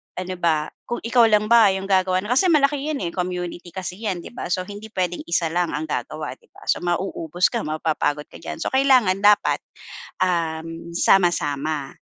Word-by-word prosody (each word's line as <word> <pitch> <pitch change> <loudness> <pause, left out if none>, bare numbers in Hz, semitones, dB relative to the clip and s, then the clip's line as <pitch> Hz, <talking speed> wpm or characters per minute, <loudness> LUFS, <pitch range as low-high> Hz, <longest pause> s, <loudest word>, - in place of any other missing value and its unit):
ano 185 0 -4
ba, 160 -3 +1 0.2
kung 240 - -4
ikaw 235 0 +4
lang 215 0 +2
ba 230 -2 +8
yung 190 - -4
gagawa 185 -1 +2
nun, 210 - -5
kasi 270 +9 +4
malaki 290 -3 +3
'yan, 290 -8 -2
eh, 170 - -2
community 180 -1 -4
kasi 185 +1 -6
'yan, 195 -6 -3
'di - - -10
ba? 240 - -6
So, 180 +1 -1
hindi 205 +3 -9
puwedeng 180 -4 -2
isa 170 -1 0
lang 175 0 0
ang - - -3
gagawa, - - -4
'di 470 - -28
ba? - - -15
So, - - 0
mauubos 175 -1 -1
ka, - - -1
mapapagod 155 -1 -1
ka - - -12
diyan. - - -6
So, - - -2
kailangan 255 -8 +4
dapat, 205 0 +4 0.6
um, 165 -1 -2
sama-sama, 155 -6 +2
185 Hz, 190 wpm, -22 LUFS, 170-210 Hz, 0.6 s, ba